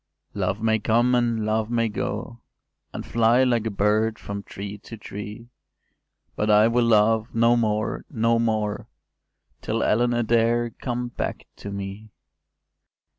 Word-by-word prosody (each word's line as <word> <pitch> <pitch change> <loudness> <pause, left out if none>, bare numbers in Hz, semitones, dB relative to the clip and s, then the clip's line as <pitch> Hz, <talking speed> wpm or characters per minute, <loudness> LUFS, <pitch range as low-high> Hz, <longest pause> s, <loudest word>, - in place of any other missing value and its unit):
’ - - -58
“Love 100 +3 -2
may 110 0 +2
come, 120 +4 +2
and 115 -3 +1
love 110 0 0
may 115 -1 +1
go, 120 +1 -4 0.5
And - - -6
fly, 115 +2 +3
like 120 -3 +1
a - - 0
bird, 110 +2 +1
from 100 0 -6
tree 100 +1 -8
to 115 +3 -10
tree: 105 +4 -8 0.8
But 105 - -1
I 105 +1 +6
will 120 +1 +2
love 110 0 +3
no 115 +1 +4
more, 110 -2 -1
no 115 +1 +1
more, 110 -2 -1 0.7
Till - - -1
Ellen 120 +2 +2
Adair 120 0 +2
come 120 0 -4
back - - -4
to 100 - -8
me. 100 +2 -6
115 Hz, 145 wpm, -24 LUFS, 105-120 Hz, 0.8 s, I